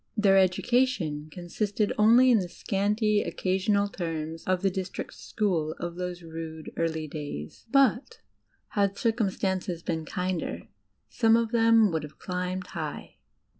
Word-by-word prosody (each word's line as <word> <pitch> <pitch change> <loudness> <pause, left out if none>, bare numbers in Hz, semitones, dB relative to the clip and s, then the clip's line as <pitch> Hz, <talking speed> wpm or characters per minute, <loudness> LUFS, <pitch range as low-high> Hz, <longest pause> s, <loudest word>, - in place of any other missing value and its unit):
Their 195 -2 +5
education 185 - +1
consisted 200 +4 -2
only 235 +4 +6
in 230 - +5
the 180 -2 -4
scanty, 210 +3 +1
occasional 200 +2 0
terms 165 -4 -4
of 185 0 0
the 195 - +3
district 190 0 -5
school 165 -7 -1
of 170 0 -4
those 180 -1 -5
rude, 160 -1 -7
early 160 -2 -1
days; 145 - -7
but, 275 - +2 0.5
had 200 -2 0
circum 225 -3 +1
stances 185 -2 -2
been 160 -1 -2
kinder, 180 - -3 0.4
some 225 -2 +3
of 230 -1 0
them 225 -3 +5
would 160 -1 -1
have 150 0 -10
climbed 180 0 -3
high. 155 -4 -6
185 Hz, 135 wpm, -27 LUFS, 165-210 Hz, 0.5 s, only